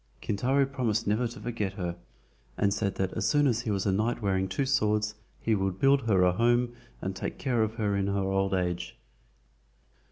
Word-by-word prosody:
Kintaro 130 Hz, +7 st, +1 dB
promised 120 Hz, -5 st, -1 dB
never 110 Hz, +4 st, +1 dB
to 115 Hz, -1 st, -10 dB
forget 105 Hz, -3 st, -3 dB
her, 90 Hz, -4 st, -3 dB, 0.6 s
and 100 Hz, -1 st, +2 dB
said 100 Hz, -2 st, -1 dB
that 95 Hz, -1 st, -1 dB
as -, -, -1 dB
soon 145 Hz, -1 st, +3 dB
as 120 Hz, -4 st, +2 dB
he 120 Hz, -, -4 dB
was 100 Hz, -2 st, 0 dB
a 100 Hz, -, +2 dB
knight 110 Hz, +6 st, 0 dB
wearing 95 Hz, -3 st, 0 dB
two 95 Hz, +9 st, -1 dB
swords 105 Hz, -5 st, +1 dB, 0.3 s
he 115 Hz, -, 0 dB
would 95 Hz, -2 st, -1 dB
build 135 Hz, -1 st, +3 dB
her 95 Hz, -4 st, +4 dB
a 90 Hz, -, +5 dB
home 120 Hz, +4 st, +2 dB, 0.3 s
and 95 Hz, 0 st, -3 dB
take 95 Hz, -, -4 dB
care 125 Hz, -4 st, 0 dB
of 110 Hz, 0 st, 0 dB
her 105 Hz, -3 st, 0 dB
in 100 Hz, 0 st, 0 dB
her 100 Hz, 0 st, 0 dB
old 95 Hz, 0 st, +1 dB
age. 90 Hz, -1 st, -2 dB
105 Hz, 200 wpm, -28 LUFS, 95-120 Hz, 0.6 s, a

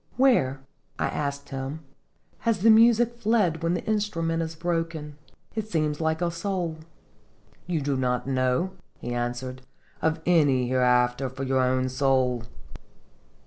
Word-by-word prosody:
"Where," 140 Hz, -, +3 dB, 0.4 s
I -, -, 0 dB
asked 140 Hz, -1 st, -3 dB
him, 135 Hz, +3 st, -5 dB, 0.6 s
"has 230 Hz, -5 st, 0 dB
the 225 Hz, +2 st, +7 dB
music 235 Hz, +1 st, +5 dB
fled 210 Hz, -8 st, +2 dB
when 165 Hz, +1 st, +1 dB
the 175 Hz, -, -4 dB
instrument 165 Hz, -7 st, 0 dB
is 160 Hz, 0 st, -4 dB
broken? 165 Hz, -3 st, -3 dB, 0.4 s
It 215 Hz, -1 st, -4 dB
seems 155 Hz, -4 st, 0 dB
like 160 Hz, +1 st, 0 dB
a 170 Hz, -, 0 dB
soul." 170 Hz, -2 st, -3 dB, 0.9 s
"You 170 Hz, -4 st, -1 dB
do 140 Hz, 0 st, 0 dB
not 125 Hz, -1 st, 0 dB
know," 130 Hz, +6 st, 0 dB, 0.3 s
he 120 Hz, -, -5 dB
answered, 120 Hz, +2 st, -3 dB, 0.4 s
"of 160 Hz, 0 st, +1 dB
any 145 Hz, -8 st, +3 dB
hereafter 125 Hz, +1 st, +2 dB
for 130 Hz, +1 st, -6 dB
your 130 Hz, -1 st, +1 dB
own 130 Hz, 0 st, +1 dB
soul 130 Hz, -2 st, +1 dB
155 Hz, 140 wpm, -26 LUFS, 130-175 Hz, 0.9 s, the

